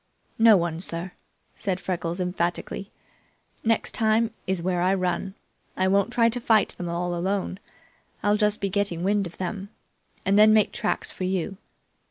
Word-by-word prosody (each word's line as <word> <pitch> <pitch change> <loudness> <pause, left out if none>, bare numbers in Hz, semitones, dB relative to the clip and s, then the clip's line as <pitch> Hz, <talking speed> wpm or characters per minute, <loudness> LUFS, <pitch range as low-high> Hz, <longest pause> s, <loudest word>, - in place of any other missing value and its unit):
"No 225 -2 +8
one, 170 -2 -1
sir," 170 0 -3 0.4
said 190 -3 -2
Freckles 175 -1 -3
emphatically. 180 +2 -2 0.7
"Next 225 0 +1
time 225 0 +2 0.2
is 190 -1 +1
where 180 0 0
I 185 +2 +3
run. 185 +1 -2 0.4
I 185 - +2
won't 200 +4 +2
try 235 -1 +4
to 240 +1 -1
fight 220 -3 +3
them 175 - -5
alone. 175 +3 -2 0.6
I'll 205 0 +3
just 210 0 +1
be 200 - 0
getting 190 -3 -1
wind 200 0 +1
of 170 - -14
them, 195 +2 -4 0.6
and 200 +1 +4
then 215 0 +7
make 215 -2 +4
tracks - - -2
for 185 - -4
you. 185 +1 -2
190 Hz, 160 wpm, -25 LUFS, 180-210 Hz, 0.7 s, No